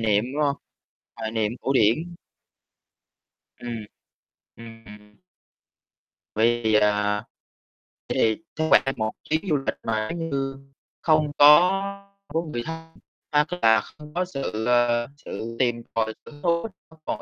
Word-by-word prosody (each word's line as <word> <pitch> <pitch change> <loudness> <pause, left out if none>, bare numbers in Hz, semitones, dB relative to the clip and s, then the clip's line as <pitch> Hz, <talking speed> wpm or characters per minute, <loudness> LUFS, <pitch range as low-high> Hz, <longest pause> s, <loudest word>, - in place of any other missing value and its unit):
niệm, 105 -1 +2
đúng 150 - +1
hông? 140 -1 +1 0.6
Hoài 110 - -4
niệm, 110 -1 0
cổ 135 - 0
điển. 140 +9 +2 1.5
Ừm. 115 -3 -5 0.7
Ừm, 115 -1 -12
ừm. 105 0 -14 1.2
Vì, 115 0 +2
à, 105 0 +2
vậy - - -70 0.9
thì - - -15 0.2
cứ 160 - -1
khoảng 135 - +4
một 110 -1 -1
chuyến 155 +1 0
du 150 - +3
lịch 135 - -2
mà 110 -1 -1
nếu 165 -1 -4
như 135 0 -2 0.4
không 155 -2 +3
có 145 +2 +9 0.7
không 165 +3 -1
có - - -10
người 120 -6 -4
thân, 165 0 -8 0.3
hoặc 150 0 +3
là 110 -1 +5
không 150 +5 -14
có 180 +2 0
sự, 135 -10 -4
ờ, 120 -1 +3
sự 115 -4 -7
tìm 120 -2 +1
tòi, 110 -1 0
hứng 145 -1 -13
thú, 170 +4 +1 0.2
không 160 0 -20
còn - - -3
120 Hz, 145 wpm, -24 LUFS, 110-150 Hz, 1.5 s, có